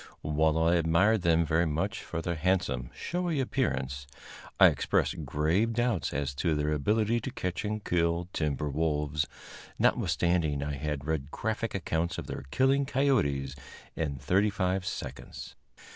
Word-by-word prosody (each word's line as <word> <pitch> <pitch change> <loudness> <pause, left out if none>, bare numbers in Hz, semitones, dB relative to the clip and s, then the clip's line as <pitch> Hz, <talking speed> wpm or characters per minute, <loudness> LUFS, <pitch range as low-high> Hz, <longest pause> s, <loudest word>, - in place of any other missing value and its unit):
While 80 +1 +2
I 85 +2 +3
admired 90 +6 +3
them 85 -1 +3
very 80 +2 +2
much 75 +1 -2
for 80 - -5
their 85 - -1
handsome, 80 -8 0
showy 175 -3 -2
appearance, 70 - -1 0.5
I - - +9
expressed 80 -5 +2
grave 80 +11 +1
doubts 120 - 0
as 70 -1 -2
to 85 -3 +1
their 75 0 0
ability 105 +10 +1
to 135 - -5
catch 90 -8 -3
and 105 0 -3
kill 85 0 +1
timber 75 -1 -1
wolves, 75 -1 0 0.5
notwithstanding 80 -5 +1
I 75 0 -3
had 70 0 -3
read 75 -3 -2
graphic 110 +5 -3
accounts 85 -2 -1
of - - -5
their - - -6
killing 135 - +2
coyotes 85 - +1 0.4
in 75 -4 -2
thirty 95 +10 +2
five 95 -2 -1
seconds. - - -6
85 Hz, 145 wpm, -29 LUFS, 75-105 Hz, 0.5 s, I